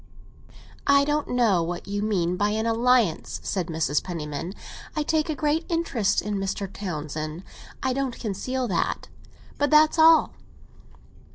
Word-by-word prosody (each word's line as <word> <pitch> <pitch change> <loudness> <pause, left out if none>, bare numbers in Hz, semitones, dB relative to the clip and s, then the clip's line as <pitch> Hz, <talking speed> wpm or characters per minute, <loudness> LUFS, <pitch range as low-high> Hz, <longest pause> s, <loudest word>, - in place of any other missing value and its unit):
"I 280 0 +5
don't 295 0 0
know 230 -8 +2
what 175 +2 -4
you 200 0 -2
mean 180 -5 0
by 205 +3 +1
an 220 +1 -1
alliance," 230 -5 +2
said 185 -4 -2
Mrs. 160 -3 0
Penniman. 165 +1 -5 0.4
"I 305 - 0
take 310 +1 0
a 310 - -1
great 300 +3 0
interest 250 - 0
in 210 -1 -2
Mr. 195 +1 -2
Townsend; 155 -2 -5 0.4
I 260 -1 +1
won't 265 -2 -2
conceal 250 +5 -2
that. 170 -3 -1 0.5
But 290 0 +2
that's 310 +1 +5
all." 320 0 +6
210 Hz, 145 wpm, -25 LUFS, 175-280 Hz, 0.5 s, all